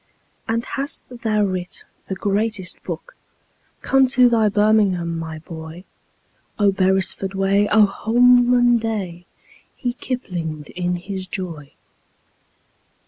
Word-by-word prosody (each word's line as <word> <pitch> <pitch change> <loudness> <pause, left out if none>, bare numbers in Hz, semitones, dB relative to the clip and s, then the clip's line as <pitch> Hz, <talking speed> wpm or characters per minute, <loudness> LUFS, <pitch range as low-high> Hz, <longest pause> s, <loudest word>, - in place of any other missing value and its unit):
"And 230 +1 -1
hast 280 +3 -4
thou 215 -2 +1
writ 185 -2 -3 0.2
the 190 - -3
greatest 205 0 -2
book? - - -7 0.7
Come 270 -1 +4
to 250 -1 +5
thy 225 -3 +3
birmingham, 200 -5 +2
my 160 -1 -6
boy! 160 +1 -9 0.7
Oh, 205 -2 +4
beresford 190 0 0
way! 195 +1 +2
Oh, 215 0 +7
holman 245 +3 +4
day!" 190 -6 -4 0.5
He 245 -2 -2
kiplinged 170 - -5
in 180 0 -2
his 190 +1 -6
joy. 170 -7 -6
200 Hz, 110 wpm, -21 LUFS, 180-225 Hz, 0.7 s, Oh